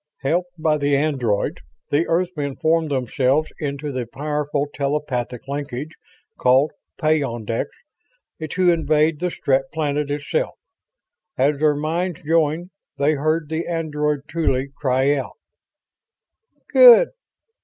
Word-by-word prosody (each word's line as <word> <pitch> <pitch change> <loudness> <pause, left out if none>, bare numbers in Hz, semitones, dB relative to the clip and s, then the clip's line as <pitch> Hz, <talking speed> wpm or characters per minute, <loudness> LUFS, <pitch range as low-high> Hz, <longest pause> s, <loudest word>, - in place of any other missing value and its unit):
Helped 175 +6 0
by 155 -1 +1
the 145 0 +2
androids, 130 -8 0 0.3
the 150 +4 +2
Earthmen 165 -5 -1
formed 160 0 +1
themselves 135 +3 +1
into 145 0 -3
the 130 -3 -4
powerful 150 +2 -2
telepathic 135 -4 -2
linkage 140 +1 -4 0.5
called 130 +4 +4 0.3
"peyondix" 120 -8 0 0.8
to 180 +1 +3
invade 155 -2 +2
the 180 - 0
Strett 135 -5 0
planet 150 -2 -1
itself. 150 - -2 0.8
As 140 +2 +2
their 150 -1 +3
minds 165 +3 -2
joined 165 +2 +1 0.3
they 145 +2 +2
heard 155 +2 0
the 160 +2 -3
android 150 -3 -1
Tuly 140 -5 0
cry 135 0 +2
out, 140 - -4 1.3
"Good...." - - +8
150 Hz, 110 wpm, -21 LUFS, 140-160 Hz, 1.3 s, Good